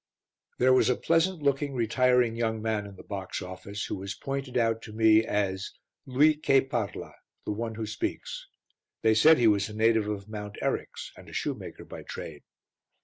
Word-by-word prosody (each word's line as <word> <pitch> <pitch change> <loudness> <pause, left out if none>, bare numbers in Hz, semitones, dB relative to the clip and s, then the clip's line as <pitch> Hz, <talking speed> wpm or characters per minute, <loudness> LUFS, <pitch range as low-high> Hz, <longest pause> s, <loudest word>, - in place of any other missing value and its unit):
There 130 +1 +5
was 130 - +4
a 125 - +3
pleasant 165 +2 +1
looking, 140 0 0
retiring 125 0 +2
young 110 -1 -1
man 110 -2 -2
in 100 - -12
the - - -12
box 95 -2 -5
office, 95 +2 -6
who - - -4
was 95 +1 -5
pointed 135 -2 -4
out 115 -1 +1
to 110 - -10
me 110 0 +5
as 100 -3 -2 0.3
"Lui 150 +4 +4
che 135 -3 +4
parla" 120 -6 -4 0.3
the - - -2
one 110 +1 -3
who 110 0 -3
speaks. - - -4 0.6
They 110 - +5
said 155 +9 +6
he 120 - +2
was 105 -1 +3
a 105 - -9
native 110 -1 +3
of 100 -1 -4
Mount 105 -1 -7
Eryx - - -3
and - - -14
a - - -13
shoemaker - - -4
by - - -9
trade. - - -8
115 Hz, 185 wpm, -28 LUFS, 105-130 Hz, 0.6 s, said